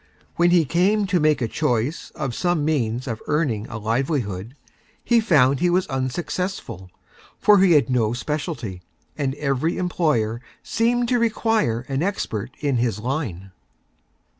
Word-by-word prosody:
When 175 0 +4
he 175 -2 +4
Came 195 +8 +2
to 185 -2 +1
Make 150 -4 +2
a - - 0
Choice 125 +2 -1
of 135 -6 -3
some 175 -2 0
means 125 -5 0
of 115 -3 -4
Earning 135 -9 0
a 115 - -6
Livelihood, 115 - -2 0.5
he 235 -1 +4
found 140 - +3
he 180 - +2
was 180 +1 +2
Unsuccessful, 135 - -3 0.5
for 210 -1 +5
he 185 -2 +5
had 150 - +4
no 120 -4 +1
Specialty, 125 - -4 0.3
and 135 -3 -2
Every 145 +3 -1
Employer 150 -11 0 0.2
seemed 240 +1 +1
to 245 - +2
Require 225 - +1
an 135 +2 -3
Expert 165 - -2
in 140 -4 +1
his 115 -3 0
Line. 110 - -4
145 Hz, 145 wpm, -22 LUFS, 120-175 Hz, 0.5 s, for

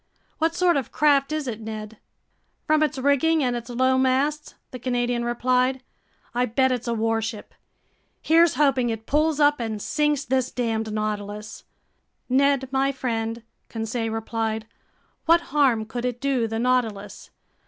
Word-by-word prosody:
"What 325 +1 +1
sort 350 -3 +3
of 270 - -3
craft 285 -1 +3
is 305 -3 -2
it, 225 -2 -5
Ned?" 215 0 -7 0.7
"From 310 0 +3
its 305 -1 +1
rigging 285 +4 +2
and 245 -1 0
its 235 0 -6
low 260 +2 +2
masts," 275 +4 0 0.2
the 255 - -7
Canadian 245 -1 -1
replied, 250 +2 +1 0.5
"I 245 +1 +1
bet 260 +3 +2
it's 250 -1 -2
a 235 - 0
warship. 225 -1 -2 0.7
Here's 330 -1 +4
hoping 265 -4 +2
it 225 -1 -4
pulls 305 +2 +1
up 290 -1 +4
and 220 -2 -3
sinks 295 +4 0
this 260 -1 0
damned 225 -3 -2
Nautilus!" 210 0 -4 0.6
"Ned 275 +1 +2
my 270 +1 +1
friend," 230 -3 -3 0.3
Conseil 225 0 -3
replied, 225 0 -3 0.6
"what 335 -1 +3
harm 260 -7 +3
could 240 +3 -5
it 245 -1 -2
do 260 -4 0
the 225 0 -3
Nautilus? 225 -5 -1
250 Hz, 150 wpm, -24 LUFS, 225-280 Hz, 0.7 s, Here's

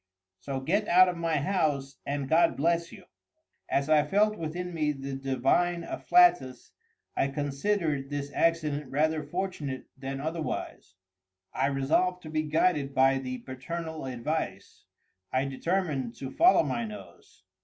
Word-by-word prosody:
]—"so 135 +8 -4
get 205 +10 0
out 185 +2 +7
of 180 - -1
my 165 -1 0
house, 140 -4 -1
and 140 -1 -2
God 165 +3 +3
bless 170 +2 +1
you!" - - -12 0.7
As 140 0 +1
I 155 -1 +5
felt 210 +7 +2
within 175 +1 -5
me 150 -2 0
the 135 0 -6
divine 135 +6 +1
afflatus, 145 - +3 0.4
I - - +2
considered 145 +1 -1
this 145 -1 -4
accident 150 -4 0
rather 155 +3 +1
fortunate 150 -4 -4
than 135 0 -5
otherwise. 155 - -4 0.6
I 135 - +1
resolved 155 +7 +1
to 155 - -8
be 155 0 +1
guided 150 -2 +1
by 135 0 +4
the 130 -1 -4
paternal 160 +4 -5
advice. 120 -5 -4 0.5
I 130 +1 +1
determined 135 -3 -2
to 135 +1 -7
follow 345 -1 +5
my 235 - -2
nose. 215 -2 -11
150 Hz, 140 wpm, -28 LUFS, 135-170 Hz, 0.7 s, out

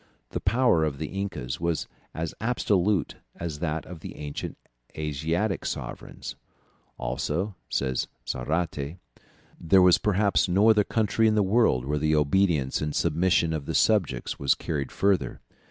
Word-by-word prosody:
The - - -2
power 120 -10 +3
of 75 -3 -1
the 75 +1 -4
incas 65 -10 -4
was 85 -3 -1 0.2
as 80 0 -4
absolute 105 -5 +1 0.2
as 80 -4 -5
that 80 -1 -2
of 90 -2 -9
the - - -8
ancient 75 -1 -6 0.4
Asiatic 80 +7 -1
sovereigns. - - -6 0.6
"Also," 75 - -2 0.2
says 65 -2 -1 0.2
Zarate, 75 +3 -2 0.6
"there 95 +2 +5
was 90 -1 +6
perhaps 100 0 +2
no 100 +5 +5
other 105 -1 +4
country 110 +1 +1
in 110 - +3
the 105 - +4
world 95 - +3
where 75 +2 -1
the 75 +1 +2
obedience 75 -2 +2
and 75 -1 -2
submission 85 0 +2
of 75 -3 -4
the 80 - -2
subjects 90 - +1
was 70 - +3
carried 70 -4 -3
further. 95 -11 +1
85 Hz, 145 wpm, -26 LUFS, 75-100 Hz, 0.6 s, was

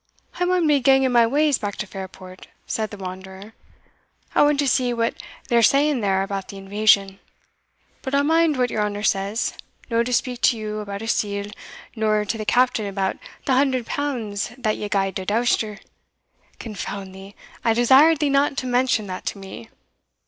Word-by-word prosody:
"I 360 - +2
maun 360 -2 +2
be 295 -2 +4
ganging 265 0 +4
my 235 -1 +5
ways 290 +2 +2
back 205 -2 -4
to - - -4
Fairport," 190 -1 -10 0.2
said 220 -1 -2
the 205 - -9
wanderer; 190 +2 -9 0.8
"I - - +4
want 290 0 +4
to 285 0 +1
see 250 -2 +1
what 230 0 0 0.3
they're 235 -1 +3
saying 280 +3 +3
there 195 -2 +1
about 195 -1 -4
the 200 - -9
invasion; 195 0 +2 0.8
but 270 0 -2
I'll 280 - +3
mind 320 -1 +3
what 250 -1 +1
your 215 - -1
honour 205 0 -2
says, 200 +2 0 0.4
no 230 0 +3
to 240 +2 -2
speak 250 0 -1
to 240 - +3
you 215 -1 -4
about 200 0 -6
a - - -5
sealgh, 205 -2 -2 0.4
or 215 -1 +1
to 225 - -2
the 215 - -4
Captain 245 -3 +2
about 195 -1 -2 0.3
the 265 - +2
hundred 260 -2 +2
pounds 230 -10 -3
that 220 -4 0
you 210 - -5
gied 195 -1 0
to 190 - -5
Douster" 220 -1 0 0.8
"Confound 200 -3 -6
thee! 195 +1 -12 0.3
I 225 - +3
desired 270 +7 +6
thee 290 0 0
not 275 0 +2
to 255 - -2
mention 245 -3 +1
that 185 -1 -7
to - - -3
me." 190 -12 -10
220 Hz, 185 wpm, -22 LUFS, 200-260 Hz, 0.8 s, desired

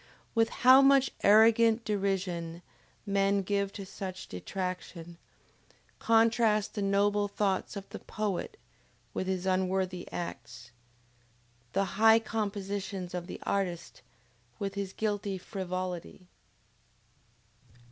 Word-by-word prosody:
With 225 -1 +3 0.2
how 260 +2 +9
much 275 -1 +5
arrogant 225 +2 +5
derision 185 -5 -2 0.4
men 200 0 +1
given 200 +1 0
to 200 - -6
such 185 -1 -7
detraction, 175 - -6 0.8
contrast 225 -2 +3
the 210 - -3
noble 205 +1 +2
thoughts 200 -1 -1
of 195 -1 -7
the - - -8
poet, 205 -3 -4 0.6
with 185 - -3
his 190 -1 -2
unworthy 185 -1 -1
acts! 120 -8 -7 1.0
The 195 - +2 0.2
high 225 0 +8
compositions 200 -4 -4
of 175 -1 -4
the - - -7
artist, 180 -4 -3 0.6
with 200 -1 -3
his 200 -1 -4
guilty 205 -2 -2
frivolity! 185 -1 -5
195 Hz, 105 wpm, -30 LUFS, 185-210 Hz, 1.0 s, how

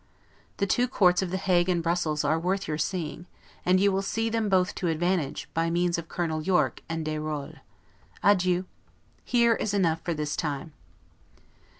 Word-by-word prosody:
The 200 - +1
two 245 +6 +2
courts 180 -8 +3
of 190 - -2
The 190 - -1
Hague 185 -2 +2
and 175 -2 +1
Brussels 165 -3 0
are 160 - +2
worth 190 +3 -1
your 150 0 -2
seeing; 170 0 -3 0.4
and 185 +1 +3
you 200 +1 +4
will 190 0 0
see 225 +3 -1
them 225 -2 0
both 185 0 +2
to 180 - 0
advantage, 165 -2 -1
by 165 +1 +1
means 170 0 +1
of 165 - -9
Colonel 160 -3 -2
Yorke 155 -7 +1
and 165 -1 -3
Dayrolles. 155 -1 -4 0.6
Adieu. 185 -2 +3 0.6
Here 235 -1 +3
is 210 -2 -2
enough 165 -5 +1
for 170 - -2
this 150 -1 -2
time. 150 +1 -3
175 Hz, 175 wpm, -27 LUFS, 160-190 Hz, 0.6 s, you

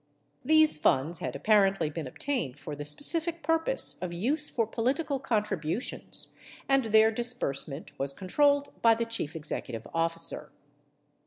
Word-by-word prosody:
These 315 - +5
funds 150 +4 +1
had 125 - -4
apparently 195 0 +2
been 155 -2 -5
obtained 230 - -3
for 145 +1 -7
the 145 0 -7
specific 330 - +3
purpose 325 +9 +1
of 180 -1 -3
use 270 - -1
for 230 - 0
political 265 +6 -1
contributions, 210 - -2 0.4
and 270 -2 +3
their 220 0 +5
disbursement 220 - -3
was 135 0 0
controlled 285 - +1
by 230 -1 +6
the 230 +1 -2
chief 230 -9 -3
executive 130 -7 -4
officer. 165 0 -2
215 Hz, 135 wpm, -28 LUFS, -, 0.4 s, by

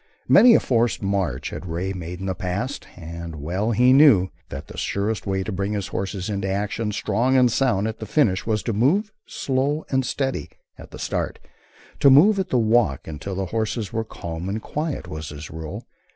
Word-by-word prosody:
Many 240 -1 +8
a - - +6
forced 120 -3 +1
march 95 -10 -1
had 90 - -7
Ray 90 +4 -3
made 90 0 -7
in - - -4
the 95 - -1
past, 100 +9 -4
and 85 -1 -7
well 90 +9 -2
he 125 +3 +4
knew 130 -11 +6 0.2
that 70 +1 -7
the - - -12
surest 100 0 -2
way 95 -1 0
to 110 - -4
bring 100 +2 -2
his 100 -3 -3
horses 95 0 -3
into 100 -2 -2
action, 105 +2 -2
strong 115 +5 +1
and 125 -2 +5
sound 110 -6 +1
at 110 - -5
the 110 - -6
finish, 105 -8 +2
was 110 -2 0
to 115 - -1
move 170 - +2 0.2
"slow 145 -7 -1
and 130 -1 +2
steady" 135 - -2 0.3
at - - -12
the - - -10
start, - - -2 0.6
to 140 - +6
move 190 +10 +6
at 190 -1 -2
the 130 - +2
walk 110 - +2
until 80 +5 -5
the 95 +1 -2
horses 110 0 -2
were 115 0 0
calm 85 -4 -6
and 110 +2 -3
quiet, 150 0 -3
was 80 0 -6
his 75 0 -8
rule. 80 -1 -7
105 Hz, 200 wpm, -23 LUFS, 90-125 Hz, 0.6 s, Many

